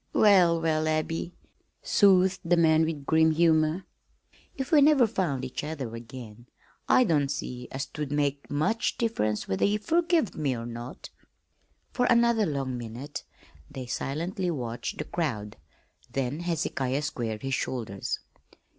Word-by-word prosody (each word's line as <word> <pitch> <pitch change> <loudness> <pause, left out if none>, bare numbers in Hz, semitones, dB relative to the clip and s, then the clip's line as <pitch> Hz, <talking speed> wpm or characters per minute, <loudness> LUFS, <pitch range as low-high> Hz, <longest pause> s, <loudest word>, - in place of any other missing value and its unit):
"Well, 180 -5 +5
well, 155 -1 +1
Abby," 160 +2 -2 0.5
soothed 190 -2 +4
the 175 +1 +2
man 160 -1 +4
with 155 -3 -4
grim 160 +1 +4
humor, 160 +1 +2 0.7
"if 265 0 -4
we 305 -3 +6
never 285 -3 +6
found 160 - -1
each 130 - -5
other 140 -7 -5
ag'in, 120 -1 -10 0.4
I 255 - +6
don't 150 - +2
see 125 -3 -5
as 135 +1 -3
'twould 145 0 -6
make 145 -1 -1
much 155 +11 0
diff'rence 110 - -1
whether 95 - -1
ye 205 +1 +3
furgived 330 - +1
me 140 -4 -1
or 115 - -6
not!" 120 +1 -8 0.8
For 245 -1 +1
another 235 -2 +4
long 135 -4 -2
minute 120 +5 -7 0.4
they 130 -1 -7
silently 170 +9 -3
watched 120 -7 -4
the - - -2
crowd. 110 - -3 0.5
Then 135 +3 -2
Hezekiah 150 -5 -1
squared 115 -6 -3
his 135 0 -2
shoulders. 115 -6 -3
155 Hz, 140 wpm, -27 LUFS, 130-180 Hz, 0.8 s, we